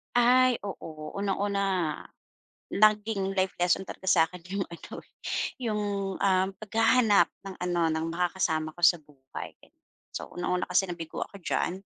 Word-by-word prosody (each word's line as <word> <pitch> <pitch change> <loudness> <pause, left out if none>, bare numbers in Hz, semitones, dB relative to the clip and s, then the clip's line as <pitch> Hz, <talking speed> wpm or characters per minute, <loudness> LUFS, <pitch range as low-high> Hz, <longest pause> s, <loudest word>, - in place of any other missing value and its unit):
Ay 250 0 +5
oo. 155 -6 -7
Unang-una 195 -4 0 0.7
naging 210 -2 +2
life 190 -1 0
lesson 180 +2 +1
talaga - - -9
sakin 170 +1 +2 0.2
yung 195 - 0
ano 170 - -11
eh, - - -26 0.5
yung, 210 -2 0 0.4
uhm, 190 -1 +3
paghahanap 225 0 +4 0.2
ng 195 -1 -7
ano, 175 -2 +1
ng 160 0 -1
makakasama 170 -3 0
ko 175 - -11
sa 170 -2 +5
buhay. 135 -3 -9 0.6
So, - - -5
unang-una 180 +1 -1
kasi 185 +2 +3
nabigo 170 -3 -6
ako 200 - -14
diyan, 175 - 0
190 Hz, 135 wpm, -28 LUFS, 170-205 Hz, 0.7 s, Ay